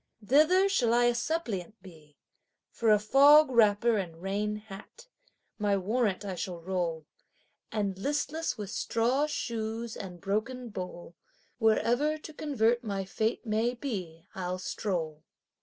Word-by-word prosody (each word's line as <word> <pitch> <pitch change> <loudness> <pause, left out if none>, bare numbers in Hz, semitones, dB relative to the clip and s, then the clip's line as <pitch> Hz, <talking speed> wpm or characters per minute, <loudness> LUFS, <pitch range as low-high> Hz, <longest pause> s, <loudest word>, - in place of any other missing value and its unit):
Thither 315 - +5
shall 245 -12 +2
I 240 - +4
a 240 0 +4
suppliant 230 - -3
be 155 -5 -16 0.5
for 230 - 0
a 210 - +7
fog 280 +7 +6
wrapper 225 -1 +4
and 170 -4 -5
rain 205 +3 -2
hat; 210 - -11 0.5
my 205 -1 +2
warrant 205 0 0
I 195 - -3
shall 180 -1 -5
roll, 170 -3 -3 0.7
And 200 -3 -2
listless 295 +6 -2
with 205 -2 -6
straw 245 +6 +1
shoes 230 -4 -4
and 180 -3 -8
broken 230 +6 -3
bowl, 180 -3 -7 0.5
wherever 240 +7 +2
to 310 0 -11
convert 240 -6 +1
my 200 -3 -3
fate 220 +5 -2
may 225 +3 0
be, 185 - -5
I'll 185 -1 -3
stroll. 170 -5 -3
215 Hz, 135 wpm, -29 LUFS, 190-245 Hz, 0.7 s, a